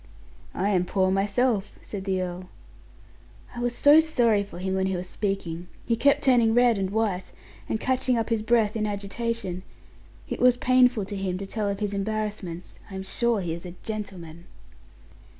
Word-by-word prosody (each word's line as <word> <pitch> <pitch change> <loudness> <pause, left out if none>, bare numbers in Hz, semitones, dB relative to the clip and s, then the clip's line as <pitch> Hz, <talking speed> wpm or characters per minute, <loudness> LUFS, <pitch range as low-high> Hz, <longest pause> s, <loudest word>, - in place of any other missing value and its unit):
"I 195 +3 0
am 185 -3 +2
poor 185 0 +1
myself," 205 +2 0
said 195 -2 -6
the 190 -1 0
earl. 180 0 -6 1.1
"I - - -5
was 240 0 -1
so 290 +2 +7
sorry 240 -10 +2
for 200 - -11
him 190 +1 -2
when 190 0 +1
he 190 - -1
was 180 +1 -4
speaking. 180 -4 -3 0.2
He 235 - +1
kept 275 +5 +3
turning 235 -4 +4
red 240 -3 +4
and 190 -1 -1
white, 205 -3 -1 0.4
and 220 - -1
catching 255 -1 +1
up 225 0 -1
his 225 -2 +1
breath 220 -1 +2
in 215 -1 0
agitation; 200 -1 -3 0.7
it - - -4
was 250 0 +5
painful 250 -4 +3
to 205 - -6
him 190 -2 -2
to 195 - -5
tell 210 +1 -2
of 200 +1 -4
his 205 -1 -1
embarrassments. 205 -4 -4
I 195 - -8
am 190 - -4
sure 230 +2 0
he 170 -3 -2
is 170 - -7
a 180 -1 -8
gentleman." 180 -6 -6
205 Hz, 185 wpm, -26 LUFS, 190-230 Hz, 1.1 s, so